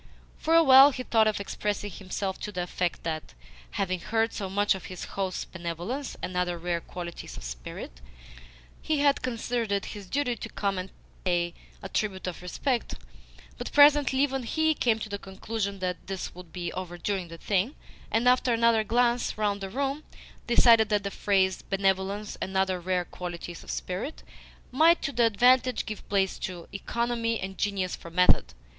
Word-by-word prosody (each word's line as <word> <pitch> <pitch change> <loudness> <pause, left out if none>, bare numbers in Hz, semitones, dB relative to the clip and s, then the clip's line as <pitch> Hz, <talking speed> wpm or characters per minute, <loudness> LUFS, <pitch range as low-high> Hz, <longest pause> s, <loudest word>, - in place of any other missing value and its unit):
For 325 +1 +2
a 330 - +8
while 270 0 +9
he 255 -2 -5
thought 225 -3 +3
of 215 -1 0
expressing 205 0 -3
himself 190 +1 -4
to 210 - -5
the 180 -3 -2
effect 175 0 -2
that, 160 -1 -4 0.3
having 185 - -1
heard 225 +3 0
so 195 -2 -4
much 205 +2 +2
of 190 - -7
his 185 -2 -7
host's 190 -2 -2
benevolence 175 - -5
and 180 0 -4
other 180 -1 0
rare 170 0 -2
qualities 170 -1 -7
of - - -8
spirit, - - -7 0.8
he 310 - 0
had 285 -1 +3
considered 235 -2 -2
it 200 -1 0
his 205 -3 -9
duty 275 -4 0
to - - -7
come 200 -2 -1
and 185 +1 -5 0.3
pay 175 -2 +1 0.3
a - - -4
tribute 195 -3 -2
of 180 -1 -5
respect; 240 +8 -2 0.6
but - - -5
presently 290 -2 +6
even 270 -2 +1
HE 315 +6 +1
came 235 -6 +2
to 220 - -5
the 200 -1 -5
conclusion 200 +1 -4
that 180 -1 -4
this 195 -1 -4
would 180 -2 -12
be 175 -1 -4
overdoing 180 +1 -3
the 165 0 -9
thing, 205 - 0 0.3
and, 230 +2 +1
after 250 0 +4
another 230 -1 +4
glance 240 +2 +1
round 205 -1 0
the 195 - -4
room, 275 +6 -2 0.4
decided 230 -2 +6
that 210 -1 +1
the 200 - -3
phrase 190 -2 +1
"benevolence 195 +1 -1
and 190 0 -2
other 190 -1 +1
rare 180 0 0
qualities 175 -1 -7
of - - -13
spirit" 195 +12 -4 0.5
might 320 +6 +5
to 275 - -2
advantage 250 +3 +4
give 215 -2 -7
place 195 -1 +1
to 175 -2 -5
"economy 230 +2 -1
and 190 0 -6
genius 195 -3 0
for 170 - -11
method." 170 - +3
200 Hz, 175 wpm, -28 LUFS, 180-235 Hz, 0.8 s, while